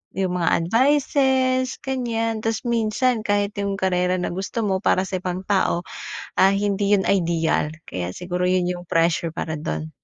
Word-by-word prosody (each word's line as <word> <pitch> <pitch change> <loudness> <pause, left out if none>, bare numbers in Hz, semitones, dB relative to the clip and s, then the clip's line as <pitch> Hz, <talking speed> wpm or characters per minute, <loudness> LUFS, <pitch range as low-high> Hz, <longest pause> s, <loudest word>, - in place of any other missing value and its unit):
'yung 190 -2 0
mga 170 - +2 0.2
advices, 260 - +2
ganyan, 230 -4 -1
tas 225 0 -1
minsan 235 +1 +1
kahit 205 -1 +1
'yung 200 0 -1
karera 180 -1 +1
na 180 - -2
gusto 195 +5 -3
mo, 190 -1 +1
para 185 - +3
sa 185 - -2
ibang 180 +1 -4
tao, 190 -3 +1 0.6
ah, 195 +1 +6
hindi 200 0 +1
'yun 190 - +1
ideal. 165 -4 +1 0.2
Kaya 90 0 -3
siguro, 180 0 -2
'yun 180 -1 +2
'yung 175 0 -5
pressure 165 0 +1
para 160 - -3
dun. 80 - -4
195 Hz, 160 wpm, -22 LUFS, 180-225 Hz, 0.6 s, ah